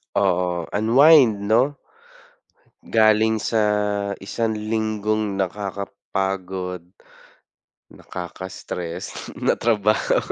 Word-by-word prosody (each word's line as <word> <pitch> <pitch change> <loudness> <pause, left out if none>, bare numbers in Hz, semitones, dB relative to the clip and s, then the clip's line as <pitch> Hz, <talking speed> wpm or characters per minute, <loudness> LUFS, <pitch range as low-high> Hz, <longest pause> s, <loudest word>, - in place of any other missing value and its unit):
Oo, 90 -3 +1
unwind, 115 0 +5
'no? 120 +7 +2 1.1
Galing 110 0 +3
sa 110 +1 0 0.6
isang 110 +3 -2
linggong 110 -1 -2
nakakapagod, 95 -2 -4 1.1
nakaka-stress 90 -1 -7
na - - +2
trabaho. 105 -2 +1
105 Hz, 65 wpm, -22 LUFS, 95-110 Hz, 1.1 s, unwind